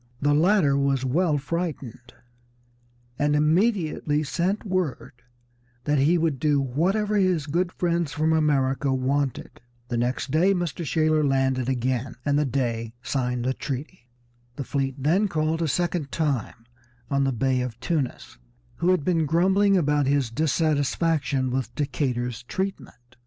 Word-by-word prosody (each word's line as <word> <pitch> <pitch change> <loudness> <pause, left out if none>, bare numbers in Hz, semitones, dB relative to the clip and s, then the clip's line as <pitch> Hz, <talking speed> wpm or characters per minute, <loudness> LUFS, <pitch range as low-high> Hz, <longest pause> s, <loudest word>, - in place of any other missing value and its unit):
The 145 +1 +2
latter 160 -2 +3
was 140 -1 +1
well 155 +3 +1
frightened, 145 -6 -5 1.0
and 145 0 +2
immediately 155 -2 +1
sent 180 +8 -1
word 185 -8 -2 0.7
that 145 +1 +1
he 155 +6 +4
would 160 -5 0
do 145 0 +2
whatever 190 - 0
his 185 -6 +2
good 175 +4 -1
friends 170 -4 -1
from 160 +1 +1
America 140 -3 +1
wanted. 130 0 -2 0.3
The 120 - -1
next 125 +3 -1
day 185 +6 +3
Mr. 175 -1 -3
Shaler 155 0 +2
landed 135 -2 +1
again, 130 0 -1
and 145 0 +2
the 150 - +1
Dey 115 -3 -2
signed 125 -3 -2
the 130 - +1
treaty. 135 +1 -6 0.5
The 140 - -4
fleet 135 0 -2
then 165 +10 +2
called 160 -1 -1
a 165 - +1
second 170 -1 -1
time 135 -7 -2 0.5
on 140 0 +2
the 135 - +1
Bey 130 +1 0
of 125 -2 -5
Tunis, 130 - -3 0.4
who 175 - +1
had 185 -6 +2
been 165 -4 +1
grumbling 190 +5 +3
about 145 -4 +1
his 140 -4 +1
dissatisfaction 145 -1 0
with 130 0 -3
Decatur's 125 -5 -2
treatment. 120 -7 -6
145 Hz, 140 wpm, -25 LUFS, 130-170 Hz, 1.0 s, he